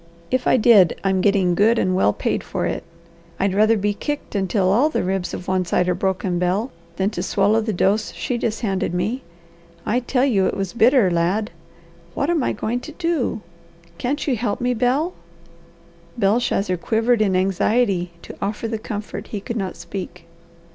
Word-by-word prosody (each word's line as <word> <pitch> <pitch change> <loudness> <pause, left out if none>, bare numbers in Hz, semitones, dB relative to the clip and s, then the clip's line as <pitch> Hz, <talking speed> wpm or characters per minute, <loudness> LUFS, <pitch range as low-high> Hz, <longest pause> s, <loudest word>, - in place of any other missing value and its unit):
If 255 0 0
I - - +5
did, 210 -7 +5
I'm 190 -1 +1
getting 195 -3 +3
good 215 +6 +3
and 185 -3 +1
well 145 - +3
paid - - -2
for - - -3
it. - - -2 0.6
I'd 195 -1 +1
rather 215 +3 +4
be 205 +1 0
kicked 290 +7 -5
until 190 -1 +1
all 250 +10 +4
the - - -1
ribs 190 -1 -2
of 180 - -7
one 185 -1 +1
side 180 +1 +1
are 180 - +2
broken, 185 -1 -1
Bel, 190 +8 0 0.2
than 195 +3 0
to 175 - -4
swallow 200 +4 +2
the 220 0 -2
dose 205 +3 +1
she 245 -2 -3
just 225 -1 -2
handed 195 -5 -1
me. 215 +9 -1 0.6
I 240 +4 +1
tell 250 +1 +1
you 200 -8 +2
it - - -2
was 195 -2 -3
bitter, 235 -4 +4
lad! 180 +6 0 0.6
What 285 +4 0
am 335 -4 +1
I - - 0
going 230 +4 -2
to 310 +4 -10
do? 330 -10 -1 0.6
Can't 280 +4 -1
you 270 - +1
help 215 -3 -2
me, 250 0 +1
Bel?" 260 +9 +1 1.0
Belshazzar 200 -3 +1
quivered 225 +5 +1
in 195 -3 +2
anxiety 190 0 +1
to - - -9
offer 210 +3 -2
the 225 -1 -3
comfort 210 -1 -6
he 210 - -4
could 230 +4 -5
not 195 -5 -3
speak. 180 -3 -7
210 Hz, 185 wpm, -21 LUFS, 190-240 Hz, 1.0 s, I